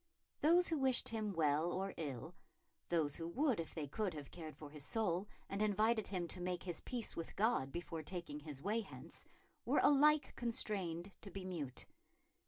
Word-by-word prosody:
Those 345 +4 +6
who 320 -3 +1
wished 260 -2 +2
him 215 -2 -1
well 160 -1 +3
or 195 +2 -1
ill, 150 +1 -4 0.6
those 160 -4 +2
who 165 - -3
would 260 - +2
if 165 - -4
they 155 -3 -2
could 195 +4 -1
have 145 -2 -7
cared 160 -3 -7
for 150 -2 -9
his 150 -1 -6
soul 195 +1 +1 0.2
and 195 +1 -2
invited 215 +1 +3
him 180 -3 -1
to 180 - -5
make 180 0 -1
his 175 -3 -4
peace 245 -3 -2
with 165 - -4
God 205 - +2
before 170 0 -4
taking 165 -2 -4
his 145 -2 -8
way 210 +4 +2
hence, 205 - -10 0.4
were - - +2
alike 295 0 +6
constrained 200 -6 -1
to 200 - -8
be 190 0 -6
mute. 150 -9 -3
180 Hz, 185 wpm, -39 LUFS, 160-220 Hz, 0.6 s, Those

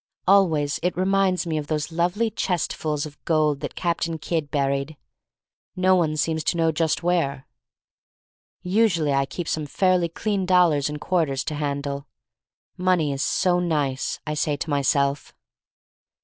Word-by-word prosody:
Always 160 -7 +3
it 180 +1 -1
reminds 190 -1 +2
me 160 -2 -1
of 145 - -6
those 150 0 -2
lovely 180 +7 0
chestfuls 155 -5 -2
of 145 -1 -12
gold 155 -3 +1
that - - -6
Captain 170 -1 -1
Kidd 155 -1 -2
buried 140 +1 -1 0.4
— - - -64
no 185 0 +6
one 155 -4 +1
seems 160 +1 0
to 170 - +1
know 165 -1 +3
just 160 +1 0
where. 150 -6 0 1.2
Usually 180 -6 +2
I 135 0 +1
keep 175 +2 -5
some 155 -2 -2
fairly 180 +1 +2
clean 195 +2 -2
dollars 170 -6 +3
and 150 0 -5
quarters 150 -6 0
to 155 - -4
handle.. 140 -1 -3 0.7
"Money 180 -5 +1
is 135 - -3
so 180 +2 +2
nice!" 145 -6 -1
I 150 - -2
say 150 -1 0
to 155 - -4
myself. 140 0 0
160 Hz, 150 wpm, -24 LUFS, 145-180 Hz, 1.2 s, no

